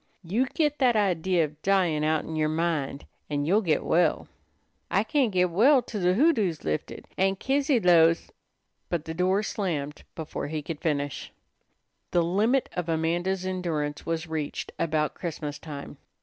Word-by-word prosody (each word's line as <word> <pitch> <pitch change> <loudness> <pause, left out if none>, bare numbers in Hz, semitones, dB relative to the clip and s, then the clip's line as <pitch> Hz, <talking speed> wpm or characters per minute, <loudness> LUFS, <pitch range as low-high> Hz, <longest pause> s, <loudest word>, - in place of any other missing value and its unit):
You 220 +10 0
git 295 +1 0
that 250 -4 +4
idea 185 -4 +2
of 150 +1 -12
dyin' 180 -6 +2
outen 160 +1 0
yer 155 -1 +1
mind, 155 -3 -1 0.2
and 145 -1 -1
you'll 195 +7 +3
git 165 -7 +1
well." 170 -1 +2 0.6
"I 195 - +2
can't 265 -1 +1
git 180 -1 +2
well 250 - +5
till 210 - -5
de 180 +1 +3
hoodoo's 220 - +2
lifted. 75 0 -3
Aunt 195 0 +2
Kizzy 275 -1 +2
'lows 170 -3 +4 0.3
" - - -50
But 170 -3 -2
the 160 - -4
door 180 +3 +1
was 210 +2 0
slammed 150 -8 -3
before 160 -3 -5
he 155 0 -4
could 155 0 -6
finish. 145 -4 -2 0.8
The 175 - +2
limit 215 +10 +2
of 175 -2 -3
Amanda's 175 +4 0
endurance 165 -6 -2
was 165 0 -2
reached 160 -3 -4
about 155 -2 0
Christmas 150 -4 -5
time. 145 -2 -8
170 Hz, 165 wpm, -27 LUFS, 155-195 Hz, 0.8 s, well